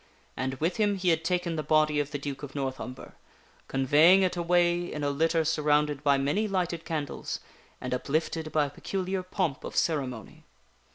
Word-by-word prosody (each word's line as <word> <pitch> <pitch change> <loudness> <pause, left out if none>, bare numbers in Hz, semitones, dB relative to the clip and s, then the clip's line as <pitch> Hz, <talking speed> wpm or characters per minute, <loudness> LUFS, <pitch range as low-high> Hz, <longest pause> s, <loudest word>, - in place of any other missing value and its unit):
And 130 +1 -2
with 165 +6 -1
him 205 -2 +2
he 185 -2 0
had 165 -1 +2
taken 175 -1 0
the - - 0
body 155 0 +3
of 145 -1 -1
the 145 - -3
Duke 140 -1 -5
of 145 -1 -8
North 135 -2 -2
Umber, 125 0 -8 0.5
conveying 150 +8 +5
it 185 - +1
away 175 0 +2
in 150 - -4
a 145 - +1
litter 160 +2 +1
surrounded 150 -2 +1
by 140 -2 +3
many 145 +11 0
lighted 180 -4 -2
candles 150 -4 -4 0.4
and 125 - -4
uplifted 155 +4 -1
by 150 -2 +2
a - - -5
peculiar 190 +4 -3
pomp 180 -5 -2
of - - -7
ceremony. 130 -9 -2
155 Hz, 180 wpm, -28 LUFS, 140-175 Hz, 0.5 s, conveying